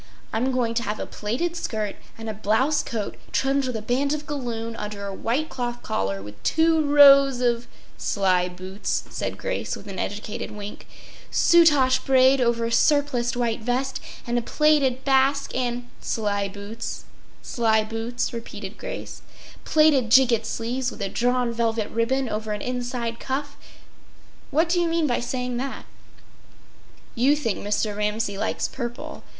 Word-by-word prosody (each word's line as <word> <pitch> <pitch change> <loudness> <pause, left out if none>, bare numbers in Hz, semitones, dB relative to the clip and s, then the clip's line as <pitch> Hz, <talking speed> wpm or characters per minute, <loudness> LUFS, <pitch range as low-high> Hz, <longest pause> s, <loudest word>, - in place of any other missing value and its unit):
I’m 245 +4 +1
going 245 -3 0
to 230 - 0
have 210 -2 -3
a - - -3
plaited 255 +12 -3
skirt 215 - -3 0.2
and 225 0 -7
a 220 - -2
blouse 220 +8 +2
coat 215 -3 -4
trimmed 270 0 +1
with 250 - -3
a 220 - -4
band 270 +5 +1
of 300 0 -4
galloon 235 -6 -4
under 210 -1 -5
a 200 - -4
white 250 +10 -1
cloth 240 -3 -4
collar 95 0 -2
with 105 0 -11
two 320 0 +3
rows 275 -2 +7
of—” 240 -1 0 0.3
“Sly 185 -3 +1
boots!” 185 +3 -3
said - - -3
Grace - - -3
with - - -11
an 195 -3 -6
educated 210 +1 -4
wink. 210 0 -8 0.4
“—soutache 295 -7 +5
braid 265 0 +5
over 235 -1 +2
a 230 - -2
surpliced 255 -3 +2
white 235 -2 0
vest; 255 +3 -1 0.3
and 240 0 0
a - - -3
plaited 275 -1 +2
basque 275 +1 +2
and—” 245 -1 -2
“Sly 205 -2 -1
boots—sly 220 +2 -3
boots!” 225 +3 -3
repeated 215 -3 -7
Grace. - - -7 0.4
“—plaited 305 -6 +4
gigot 235 -3 +5
sleeves 245 +3 -2
with 220 - -7
a 195 - -1
drawn 245 +1 +1
velvet 225 -2 -1
ribbon 255 +4 0
over 215 -1 -3
an 210 - -4
inside 245 -2 -3
cuff. 285 +2 -3 0.9
What 320 +4 +2
do 350 +1 +1
you 345 - +2
mean 330 -1 +1
by 245 -4 +1
saying 250 0 -3
that?” 265 +2 -4 1.3
“You 265 +5 +3
think 230 -9 -2
Mr. 205 0 -1
Ramsay 210 -1 -1
likes - - -1
purple. 240 +1 -6
240 Hz, 155 wpm, -24 LUFS, 215-270 Hz, 1.3 s, rows